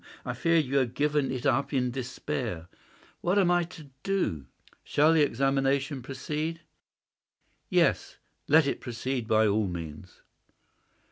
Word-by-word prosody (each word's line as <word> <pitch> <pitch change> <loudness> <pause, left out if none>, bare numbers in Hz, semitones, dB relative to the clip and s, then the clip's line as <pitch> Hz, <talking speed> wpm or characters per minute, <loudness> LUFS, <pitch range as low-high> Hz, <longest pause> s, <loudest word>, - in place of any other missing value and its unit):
I - - -2
feared 165 -2 +2
that - - -9
you 140 +2 0
had 125 -4 0
given 150 -1 +1
it 130 0 -4
up 135 0 +2
in 125 -2 +1
despair. 125 - -4 0.5
What 180 +3 +1
am 185 -3 +4
I 175 0 +4
to 160 -5 -13
do? 185 - -1 0.4
Shall 155 +3 +3
the 160 - +4
examination 135 +1 +1
proceed?" 150 +6 -4 1.1
"Yes; - - +2 0.3
let 155 0 +6
it 140 - -2
proceed 125 0 -3
by 110 0 +4
all 105 0 +2
means." 85 -1 -8
135 Hz, 140 wpm, -28 LUFS, 120-150 Hz, 1.1 s, let